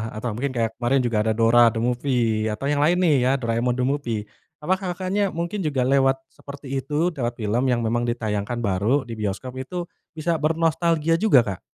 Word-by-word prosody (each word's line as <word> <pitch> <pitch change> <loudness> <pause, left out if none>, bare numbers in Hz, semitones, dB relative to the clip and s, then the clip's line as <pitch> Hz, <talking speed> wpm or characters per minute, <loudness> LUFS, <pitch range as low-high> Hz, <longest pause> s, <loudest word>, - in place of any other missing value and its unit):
atau 110 +3 -4
mungkin 135 +1 -2
kayak 115 -1 0
kemarin 125 +3 +1
juga 115 -2 0
ada 110 - +2
Dora 115 +1 +5
The 115 - -2
Movie 120 -3 0
atau 135 - -5
yang 145 0 +1
lain 175 +3 +3
nih 165 -4 +4
ya, - - +3
Doraemon 115 +1 0
The 125 0 -1
Movie. 120 -7 -2 0.4
Apakah, 185 +2 -1
Kakaknya, 190 +2 -1
mungkin 170 +2 -3
juga 140 -4 0
lewat 135 0 +2
seperti 140 -1 -11
itu, 150 +6 0
lewat 120 -1 -1
film 110 +5 0
yang 120 -1 +1
memang 120 +1 0
ditayangkan 115 -1 -2
baru 105 +7 +1
di 115 -3 -8
bioskop. 110 +5 -4
Itu 175 +6 -5 0.2
bisa 160 +1 -1
bernostalgia 165 +1 +1
juga, 190 - +5
Kak? 100 -5 -5
130 Hz, 190 wpm, -23 LUFS, 115-155 Hz, 0.4 s, Dora